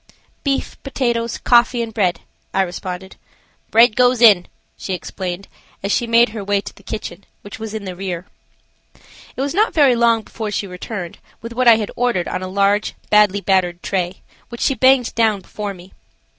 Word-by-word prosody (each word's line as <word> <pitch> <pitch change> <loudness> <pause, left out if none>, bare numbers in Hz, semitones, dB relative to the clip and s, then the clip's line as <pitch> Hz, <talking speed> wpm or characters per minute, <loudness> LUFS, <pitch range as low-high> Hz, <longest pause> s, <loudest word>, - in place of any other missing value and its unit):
"Beef, 275 -2 -2
potatoes, 235 -4 -2
coffee 240 0 +3
and 225 -1 -7
bread," 190 -6 0 0.3
I 195 - +4
responded. 185 +1 -7 0.5
"Bread 230 -1 +5
goes 250 -1 +3
in," 210 -7 +6 0.3
she 190 - -4
explained, 180 +1 -6 0.4
as 200 - -1
she 235 - +1
made 235 +1 +5
her 215 -2 -6
way 200 0 +1
to - - -8
the - - -19
kitchen, 210 -2 -7 0.2
which 205 - -10
was 220 -1 -6
in 215 -2 -5
the 185 -1 -6
rear. 180 -2 -5 1.1
It - - -4
was 280 +2 -1
not 425 +5 +1
very 280 -6 +5
long 230 -1 +3
before 220 0 -6
she 205 0 -2
returned 180 -1 -7 0.2
with 230 0 -6
what 250 +1 +1
I 230 - +9
had 215 -2 -3
ordered 240 -8 0
on - - -3
a 185 - -4
large, 200 +2 +1 0.2
badly 210 -1 +4
battered 180 -3 +1
tray, 185 -1 -2 0.3
which 235 - -8
she 275 - +2
banged 260 -2 +3
down 220 -3 +2
before 205 +1 -6
me. 180 +1 -15
210 Hz, 185 wpm, -19 LUFS, 190-235 Hz, 1.1 s, I